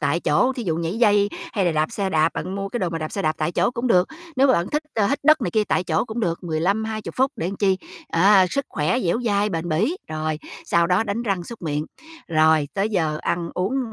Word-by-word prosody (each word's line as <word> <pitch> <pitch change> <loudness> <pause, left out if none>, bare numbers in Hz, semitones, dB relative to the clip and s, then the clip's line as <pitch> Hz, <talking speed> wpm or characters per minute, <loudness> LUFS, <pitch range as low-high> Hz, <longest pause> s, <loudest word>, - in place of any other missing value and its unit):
tại 155 +3 0
chỗ, 260 - +2
thí 250 -2 -5
dụ 165 -4 0
nhảy 170 +6 -2
dây 205 -3 +4 0.2
hay 200 -4 0
là 175 - +2
đạp 155 0 0
xe 195 -2 -2
đạp, 160 -1 +2
bạn 185 +4 -4
mua 195 0 -3
cái 240 - -4
đồ 180 - 0
mà 165 - -3
đạp 155 -1 -5
xe 195 - -2
đạp 155 -1 +1
tại 155 +2 -1
chỗ - - +2
cũng 250 +1 -3
được. 180 -5 +3 0.3
Nếu 270 +2 +5
mà 260 - +5
bạn 170 -3 +1
thích, 300 +1 0
a, 210 -3 +2
hít 280 - 0
đất 310 0 +6
này - - -1
kia 215 -1 +1
tại 185 - 0
chỗ 160 +3 0
cũng 230 0 -5
được, 170 -2 -2
15-20 200 +7 -1
phút 265 +3 +2
để 170 - -2
làm 195 - -5
chi, 190 -2 +2 0.3
à, 190 +2 +5
sức 275 -1 -1
khỏe 155 +12 0
dẻo 205 +4 0
dai, 205 -1 +2
bền 170 -1 -3
bỉ. 215 - +1
Rồi, 155 0 -2 0.3
sau 170 0 +2
đó 180 +4 +2
đánh 225 +2 -2
răng 195 -6 -1
súc 235 -6 -10
miệng, 150 -1 -2 0.4
rồi 155 -2 +3
tới 200 +2 0
giờ 160 -6 0
ăn 170 -1 -2
uống, 230 +6 -1
190 Hz, 260 wpm, -22 LUFS, 165-220 Hz, 0.4 s, đất